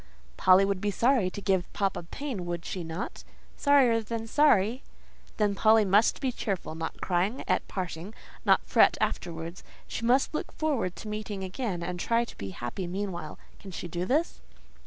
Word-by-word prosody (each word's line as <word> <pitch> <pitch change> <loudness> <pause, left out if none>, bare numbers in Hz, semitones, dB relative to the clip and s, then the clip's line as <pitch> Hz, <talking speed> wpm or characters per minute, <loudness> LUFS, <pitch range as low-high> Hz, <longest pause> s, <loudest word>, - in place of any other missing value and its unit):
"Polly 185 +1 +6
would 195 -1 -1
be 210 - 0
sorry 230 -1 +2
to 205 - -7
give 190 -3 0
papa 195 -3 0
pain; 200 - -5
would 170 -1 -4
she 185 - -4
not?" 165 +3 -5 0.3
"Sorrier 265 -6 +4
than 225 +1 -4
sorry." 235 -3 +3 0.6
"Then 210 -2 +2
Polly 220 +2 +5
must 200 +3 +4
be 265 - 0
cheerful: 195 -9 -3
not 160 0 -5
cry 190 +7 0
at - - +1
parting; 185 +2 -5 0.3
not - - +5
fret - - +5
afterwards. 170 0 -3 0.2
She - - -5
must 255 +6 +3
look 305 - -3
forward 270 - -1
to - - -9
meeting 210 -2 -4
again, 190 -2 -3
and 180 +1 -4
try 235 +4 +1
to - - -12
be 100 - -6
happy 120 - -5
meanwhile. 180 -4 -4 0.2
Can 195 - -10
she 180 -1 -6
do 175 +1 -3
this?" 300 - 0
195 Hz, 175 wpm, -28 LUFS, 175-230 Hz, 0.6 s, Polly